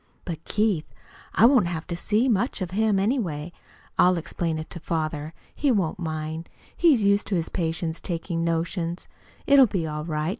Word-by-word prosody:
But, 165 -3 -5
Keith 210 -7 0 0.4
I 220 - +6
won't 245 -7 +5
have 165 -2 -4
to 170 - -4
see 215 +8 +1
much 235 +1 +1
of 180 -3 -3
him, 215 +1 +2
anyway. 190 - -1 0.5
I'll 180 0 +5
explain 165 0 -2
it 155 - -5
to 170 - -5
father. 155 -2 -2 0.2
He 290 -2 +1
won't 185 -7 0
mind. 160 0 -4 0.3
He's 300 -11 +4
used 200 0 +3
to 200 - 0
his 165 -2 -1
patients 165 -1 -2
taking 170 -1 -3
notions. 170 +1 -2 0.4
It'll 280 -2 +7
be 185 -5 -2
all 150 -1 -4
right. 155 -1 -1
170 Hz, 175 wpm, -25 LUFS, 160-205 Hz, 0.5 s, It'll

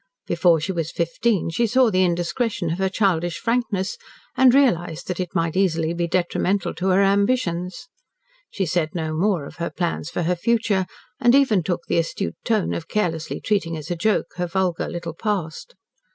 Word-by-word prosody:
Before 170 -3 +3
she 160 +5 -2
was 165 -3 -3
fifteen 170 +2 0
she 235 +8 +1
saw 250 +1 +3
the 185 -1 +3
indiscretion 175 +2 -1
of 170 - -3
her 190 0 +1
childish 175 -4 0
frankness, 230 - -1 0.4
and 260 -1 +6
realised 175 - +2
that 180 -1 -3
it 180 0 -4
might 165 -1 0
easily 165 -4 +1
be 170 0 -1
detrimental 185 +2 0
to 185 - -3
her 190 +1 +4
ambitions. 195 - 0 0.6
She 195 - -2
said 160 -1 -1
no 160 -2 -2
more 175 -2 +1
of - - -11
her 170 0 -2
plans 170 -3 -3
for 175 - -2
her 180 +2 +1
future, 205 -1 +1 0.3
and 240 +2 +5
even 260 -9 +4
took 175 0 -3
the - - +1
astute 160 - -3
tone 215 -4 +1
of 165 - -5
carelessly 165 -6 -2
treating 180 -6 0
as 155 +2 -7
a - - 0
joke 210 +6 0
her 175 0 -1
vulgar 185 -1 -1
little 170 -1 -5
past. 205 - -3
180 Hz, 180 wpm, -22 LUFS, 170-205 Hz, 0.6 s, and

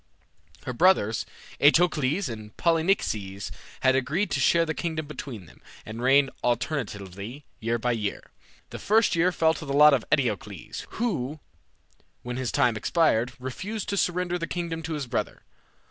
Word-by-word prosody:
Her 130 - -3
brothers, 125 - +3 0.3
Eteocles 155 +2 +3
and 110 -2 -8
Polynices, 160 - 0 0.3
had 130 0 +4
agreed 145 +10 0
to - - 0
share 170 -1 +4
the 160 - -2
kingdom 160 -2 -3
between 130 -8 -7
them, - - -19 0.2
and 110 +2 -7
reign 135 +2 +4
alternately 120 - -3
year 115 +1 0
by 125 +2 0
year. 105 -4 -3 0.4
The - - -6
first 220 -2 +3
year 175 +2 +3
fell 160 -2 +3
to 160 - -7
the 140 - -2
lot 150 0 +8
of 130 -5 +2
Eteocles, 105 - -2
who, 155 - -2 0.8
when 125 0 -4
his 130 -3 -2
time 120 -2 +2
expired, 125 -2 +2
refused 185 - -5
to 200 - 0
surrender 180 -1 0
the 165 - -3
kingdom 170 -2 -3
to 160 0 -4
his 150 -3 -3
brother. 120 - -3
140 Hz, 155 wpm, -26 LUFS, 120-165 Hz, 0.8 s, lot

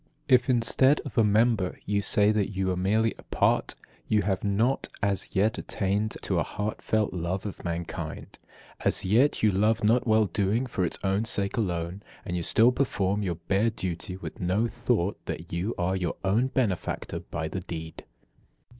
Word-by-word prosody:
If, 125 0 +4
instead 130 +4 +3
of 140 - -9
a 115 - +5
member, 105 -2 +2
you 100 0 +1
say 105 +1 +3
that 105 -2 0
you 95 -2 -1
are - - 0
merely 105 +5 +1
a - - -9
part, - - +1 0.3
you 105 -2 +2
have 95 -1 -1
not 110 +6 +1 0.2
as 100 -1 -1
yet 105 +3 +2
attained 100 +2 -1
to - - 0
a - - +2
heartfelt 105 +1 -2
love 90 +3 -3
of 100 - -6
mankind. 85 -2 -5 0.4
As - - +2
yet 115 +10 +3
you 105 - +5
love 110 +4 +2
not 120 +4 +3
well 110 -1 +4
doing 105 +6 0
for 105 -7 -2
its - - -1
own 100 +3 +1
sake 100 -3 0
alone, 90 -3 -2 0.2
and 90 - -3
you 90 - -1
still 115 +8 +4
perform 105 -6 0
your 90 -4 -1
bare 100 +7 +1
duty, 90 -4 -5
with 100 - -8
no 95 +4 +1
thought 115 -6 -1
that 85 0 -6
you 95 +7 -2
are 90 0 0
your 90 -3 -2
own 105 +7 +2
benefactor 115 -9 -2
by 80 -1 -5
the 95 - -4
deed. 80 -2 -7
100 Hz, 180 wpm, -27 LUFS, 90-110 Hz, 0.4 s, a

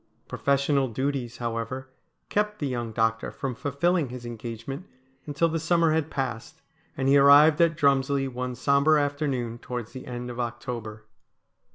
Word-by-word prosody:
Pro - - -7
fessional 140 -2 +2
duties, 130 -1 -2
however, 120 +2 -4 0.4
kept 210 0 0
the 150 - -3
young 120 -4 -3
doctor 115 0 0
from 135 -2 -4
fulfilling 145 +4 0
his 125 -1 -8
engagement 120 - -6 0.4
until 150 +3 +1
the 165 0 -1
summer 165 0 +2
had 160 -1 0
passed, 130 +3 -5 0.3
and 130 - 0
he 140 +1 +6
arrived 145 +3 +7
at 165 -2 +3
Drumslie 140 -1 +2
one 125 -1 -4
sombre 140 +4 +3
afternoon 140 -5 -2
towards 120 -3 -6
the 130 - -9
end 125 0 -5
of 120 - -8
October. 115 -3 -5
135 Hz, 155 wpm, -26 LUFS, 120-145 Hz, 0.4 s, arrived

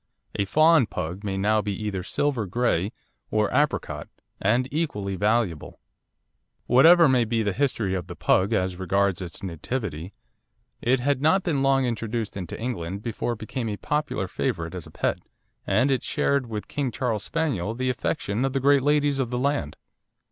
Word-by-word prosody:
A 100 - 0
"fawn" 155 +3 +5
Pug 90 +4 -5
may 95 -2 -2
now 105 +2 +2
be 105 -1 -4
either 105 -3 -3
silver 120 +2 -1
grey 105 -2 0 0.4
or 105 0 +1
apricot, 145 +3 0 0.3
and 120 +6 +2
equally 105 -12 -2
valuable. 105 -5 0 0.9
Whatever 165 +7 +7
may 130 -2 +4
have 115 -2 0
been 115 -2 +1
the 100 - 0
history 115 -6 0
of 90 -3 -3
the - - -7
Pug 95 +4 +2
as 95 -4 0
regards 100 0 +1
its 90 +1 -7
nativity, 90 - -4 0.7
it 125 +2 +2
had 135 +1 0
not 180 +6 +3
been 145 -6 0
long 135 -1 +3
introduced 115 -2 -3
into 90 -4 -6
England 100 -5 -4
before 120 +1 -2
it - - -8
became 115 +2 -4
a 105 - -3
popular 150 -9 -2
favourite 85 -1 -2
as 90 -3 -7
a - - -13
pet, - - -1 0.5
and 135 +2 +3
it 130 - +1
shared 140 -3 0
with 110 -2 -4
the - - -19
King 140 -3 0
Charles 110 -2 -2
Spaniel 120 - -1
the 130 +1 0
affection 125 -3 -2
of 135 -1 0
the 135 - +1
great 140 +1 +4
ladies 145 0 +2
of 130 -3 0
the 125 - -2
land. 130 - -1
115 Hz, 180 wpm, -25 LUFS, 100-135 Hz, 0.9 s, Whatever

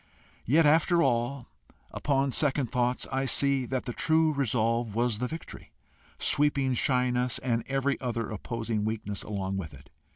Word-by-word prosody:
Yet 155 +7 +4
after 165 +3 +4
all, 120 +1 0 0.4
upon 140 -1 0
second 135 -3 +1
thoughts, 125 0 0
I 135 0 0
see 135 -1 +1
that 130 0 -3
the 120 - -4
true 160 +2 +2
resolve 115 -4 0
was 120 -2 0
the 125 - -1
victory, 160 +5 -9 0.4
sweeping 140 -2 +2
shyness 125 0 +1
and 120 -3 -1
every 135 0 -1
other 120 -3 -2
opposing 110 0 -3
weakness 105 -2 -3
along 95 -2 -3
with 80 -6 -6
it. 70 +1 -17
125 Hz, 150 wpm, -28 LUFS, 115-140 Hz, 0.4 s, Yet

